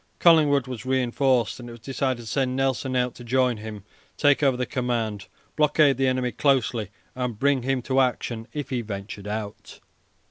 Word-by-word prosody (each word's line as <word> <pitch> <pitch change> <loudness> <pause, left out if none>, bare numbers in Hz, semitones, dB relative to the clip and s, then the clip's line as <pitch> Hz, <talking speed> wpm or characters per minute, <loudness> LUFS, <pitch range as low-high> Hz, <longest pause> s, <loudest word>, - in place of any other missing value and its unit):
Collingwood 150 -6 +5
was 125 -4 -6
reinforced, 130 -1 +1
and 120 -1 -8
it - - -9
was 120 - -12
decided 130 0 -2
to - - -11
send 130 +3 -1
Nelson 130 0 0
out 125 -1 +1
to 120 - -12
join 125 0 +1
him, 105 -2 -8 0.3
take 145 -1 +4
over 135 -3 +3
the 125 - -1
command, 115 -6 -2 0.3
blockade 150 -2 +4
the 135 0 +2
enemy 130 -1 0
closely, 125 -7 +1 0.2
and 125 -3 -3
bring 140 +1 +2
him 130 0 -1
to 130 +1 +1
action 120 -3 -1
if 145 -2 -5
he 125 -2 0
ventured 100 -1 -7
out. 105 0 -6
125 Hz, 180 wpm, -25 LUFS, 115-135 Hz, 0.3 s, Collingwood